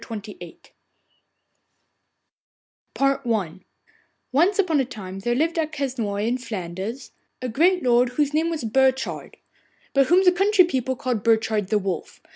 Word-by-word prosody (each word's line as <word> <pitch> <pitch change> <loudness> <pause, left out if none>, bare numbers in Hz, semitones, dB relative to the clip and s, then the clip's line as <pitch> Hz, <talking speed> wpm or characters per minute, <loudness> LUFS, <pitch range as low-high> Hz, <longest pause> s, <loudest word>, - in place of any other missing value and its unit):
THE 230 - -7 0.3
NETTLE 175 -2 -10 2.4
SPINNER 275 0 +1
I 200 -8 -2 0.7
Once 345 +9 +3
upon 345 -7 +2
a 265 - +1
time 195 -6 -8
there 240 +5 -1
lived 330 +5 0
at 310 -1 -1
Quesnoy, 245 -8 -2
in 250 +2 -1
Flanders, 205 +2 -6 0.3
a 255 - -4
great 345 +10 +2
lord 245 0 +3
whose 295 -1 +1
name 320 +2 +1
was 320 -5 -4
Burchard, 265 +3 0 0.6
but 275 -1 +3
whom 365 +3 +4
the 360 - +6
country 390 +1 +4
people 260 -5 -2
called 245 -4 -2
Burchard 220 -2 +1
the 210 - +1
Wolf. 190 -4 -4
255 Hz, 145 wpm, -23 LUFS, 220-310 Hz, 2.4 s, the